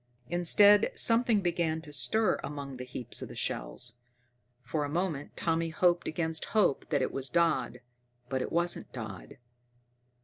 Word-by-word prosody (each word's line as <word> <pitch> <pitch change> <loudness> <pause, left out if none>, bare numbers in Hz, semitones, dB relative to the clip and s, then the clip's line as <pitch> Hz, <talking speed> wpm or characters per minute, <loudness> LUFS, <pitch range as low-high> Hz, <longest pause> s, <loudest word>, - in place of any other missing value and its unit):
Instead, 200 +4 +5
something 230 -2 +4
began 170 -3 0
to 150 -2 -12
stir 220 +9 +2
among 140 -2 -6
the 125 - -6
heaps 125 -1 -5
of - - -8
shells. 65 - -4 0.7
For 145 +4 -2
a 145 - -3
moment 160 -3 -3
Tommy 165 0 0
hoped 175 0 +1
against 160 0 -2
hope 195 -10 +2
that 145 -4 +1
it - - -2
was 135 0 -3
Dodd, 170 -7 +1 0.5
but 130 0 -2
it - - -4
wasn't 170 +1 0
Dodd. 110 -7 -8
160 Hz, 145 wpm, -30 LUFS, 135-175 Hz, 0.7 s, Instead